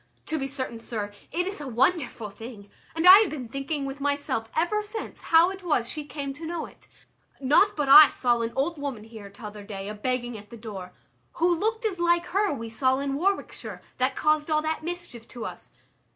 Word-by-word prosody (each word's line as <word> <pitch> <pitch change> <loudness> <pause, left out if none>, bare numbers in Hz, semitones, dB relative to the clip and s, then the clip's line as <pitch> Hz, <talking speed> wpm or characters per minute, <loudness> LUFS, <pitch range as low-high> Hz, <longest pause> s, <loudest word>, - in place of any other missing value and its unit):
To 315 -1 -2
be 270 - -2
certain, 260 -4 -4
sir, 210 -3 -5 0.2
it 355 +2 0
is 385 -4 -5
a 290 - -6
wonderful 250 - 0
thing, 205 -1 -11 0.2
and 325 +1 0
I 375 +2 +11
have 425 -4 +2
been 265 -6 -6
thinking 275 +3 -3
with 275 +1 -6
myself 285 -6 -1
ever 350 +7 +1
since, 425 +1 -7
how 335 +3 +4
it 385 0 -8
was 295 -10 0
she 300 +3 -5
came 285 -2 -5
to 310 +4 -9
know 340 -1 -3
it; - - -17 0.5
not 295 +10 +4
but 295 -2 -1
I 295 +2 +10
saw 240 -2 +1
an 230 0 -2
old 300 +4 -1
woman 275 -7 -4
here 220 -2 -11
t'other 210 0 -9
day 200 -1 -7
a - - -4
begging 245 +2 -2
at 205 0 -15
the 235 - -10
door, 200 -5 -8 0.4
who 345 +1 +2
looked 445 +6 -1
as 385 -5 -1
like 345 0 +2
her 405 +1 +2
we 230 -5 -4
saw 260 +3 +1
in 275 0 -2
Warwickshire, 385 +8 -2 0.2
that 255 +1 +1
caused 305 0 +1
all 305 0 +2
that 315 0 -2
mischief 345 -9 -6
to 240 -3 -7
us. - - -8
280 Hz, 210 wpm, -26 LUFS, 230-335 Hz, 0.5 s, I